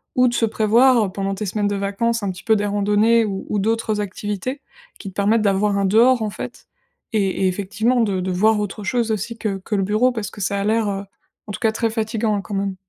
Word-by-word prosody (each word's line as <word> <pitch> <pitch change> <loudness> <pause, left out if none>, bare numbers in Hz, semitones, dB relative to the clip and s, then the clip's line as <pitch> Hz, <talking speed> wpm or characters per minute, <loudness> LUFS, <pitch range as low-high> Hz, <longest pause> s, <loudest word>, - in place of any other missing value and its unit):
ou 250 0 +4
de 240 - 0
se 230 - +2
prévoir 225 0 +3
pendant 195 0 -2
tes 210 +1 -4
semaines 205 +2 -1
de 205 - -1
vacances 200 +4 -1
un 195 - -1
petit 180 - -11
peu 220 -1 +3
des 205 - 0
randonnées 210 +3 +3
ou 195 -2 -4
ou 210 - 0
d'autres 220 0 0
activités, 210 +7 -4 0.4
qui 195 - -7
te - - -15
permettent 210 +3 +2
d'avoir 200 0 +2
un 200 - +1
dehors 235 +5 +4
en 215 - -1
fait, - - -8 0.5
et 195 -3 0
et - - +4
effectivement, 210 +6 0
de 200 -4 0
de 185 0 -2
voir 210 +4 +3
autre 205 0 -4
chose 230 +2 0
aussi 220 +2 -3
que 200 -4 -2
que 210 +3 -3
le 195 - +1
bureau, 215 +6 +2
parce 220 -4 -5
que 205 - -9
ça 200 +1 -1
a - - -1
l'air, 220 0 +1
heu, 195 0 -3 0.4
en - - -5
tout - - -6
cas 220 - +3
très 225 +1 -1
fatigant, 220 -1 -1
hein, 200 - -2
quand 200 +1 -6
même. 195 -1 -2
210 Hz, 245 wpm, -21 LUFS, 200-225 Hz, 0.5 s, ou